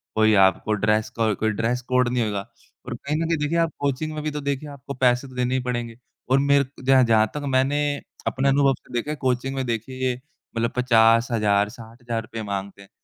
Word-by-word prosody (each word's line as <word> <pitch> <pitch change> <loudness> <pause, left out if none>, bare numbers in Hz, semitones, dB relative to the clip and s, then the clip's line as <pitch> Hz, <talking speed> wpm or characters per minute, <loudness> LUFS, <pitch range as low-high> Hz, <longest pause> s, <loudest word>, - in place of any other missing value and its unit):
कोई 110 0 +4
आपको 95 +3 0
ड्रेस 105 +1 +1
को 110 -2 +2
कोई 110 - 0
ड्रेस 115 +4 -1
कोड 125 -1 +3
नहीं 125 -1 0
होएगा 105 -2 -2 0.5
और 125 -1 -5
कहीं 140 +5 -4
न 165 - -1
कहीं 165 -1 +1
देखिए 150 +3 -1
आप 165 -1 +1
कोचिंग 145 +2 -2
में 155 - -4
भी 155 - -2
तो 150 0 -4
देखिए 140 +1 -3
आपको 140 0 -8
पैसे 125 +1 +2
तो 130 - -14
देने 125 0 0
ही 130 - 0
पड़ेंगे। 120 -2 -3 0.3
और 130 - +4
मेर 140 0 +4
क 135 0 -15
जहाँ 135 -1 +6
जहाँ 110 -2 +4
तक 150 - -3
मैंने 135 +2 +2 0.5
अपने 135 +1 +1
अनुभव 135 0 +4
से - - -18
देखा 120 +5 -2
है - - -2
कोचिंग 130 +1 -1
में 130 - -2
देखिए 125 +2 -2 0.4
मतलब 115 +1 0
50000, 115 -4 +3
60000 115 0 -6
रुपए 110 0 -7
माँगते 100 0 -5
हैं। 100 - -16
125 Hz, 215 wpm, -23 LUFS, 115-135 Hz, 0.5 s, जहाँ